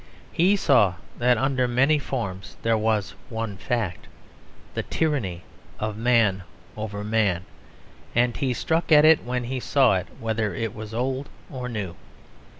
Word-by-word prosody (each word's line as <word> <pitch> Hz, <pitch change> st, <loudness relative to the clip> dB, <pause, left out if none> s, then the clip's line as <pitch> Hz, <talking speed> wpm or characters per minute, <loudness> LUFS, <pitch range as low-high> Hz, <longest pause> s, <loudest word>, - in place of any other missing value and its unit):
He 185 Hz, +5 st, +4 dB
saw 115 Hz, -, +4 dB, 0.2 s
that 125 Hz, 0 st, +4 dB
under 130 Hz, 0 st, +1 dB
many 135 Hz, +5 st, +3 dB
forms 100 Hz, -8 st, -5 dB
there 115 Hz, 0 st, +3 dB
was 110 Hz, -2 st, 0 dB, 0.2 s
one 115 Hz, -3 st, -4 dB
fact, 100 Hz, -1 st, -3 dB, 0.7 s
the -, -, -1 dB
tyranny 115 Hz, -, -1 dB, 0.4 s
of 105 Hz, -1 st, -2 dB
man 115 Hz, -4 st, +3 dB, 0.3 s
over 105 Hz, -1 st, -5 dB
man; 105 Hz, -5 st, +1 dB, 0.7 s
and 120 Hz, 0 st, +3 dB
he 135 Hz, -3 st, 0 dB
struck 160 Hz, +7 st, -1 dB
at 150 Hz, 0 st, +8 dB
it 160 Hz, -1 st, +6 dB
when 125 Hz, 0 st, -2 dB
he 130 Hz, +2 st, -3 dB
saw 125 Hz, -5 st, +3 dB
it, 90 Hz, -, -4 dB
whether 110 Hz, -4 st, -1 dB
it 115 Hz, +1 st, -3 dB
was 110 Hz, 0 st, -7 dB
old 130 Hz, +3 st, -2 dB, 0.2 s
or 125 Hz, -3 st, -5 dB
new. 100 Hz, -7 st, -4 dB
115 Hz, 150 wpm, -25 LUFS, 105-130 Hz, 0.7 s, at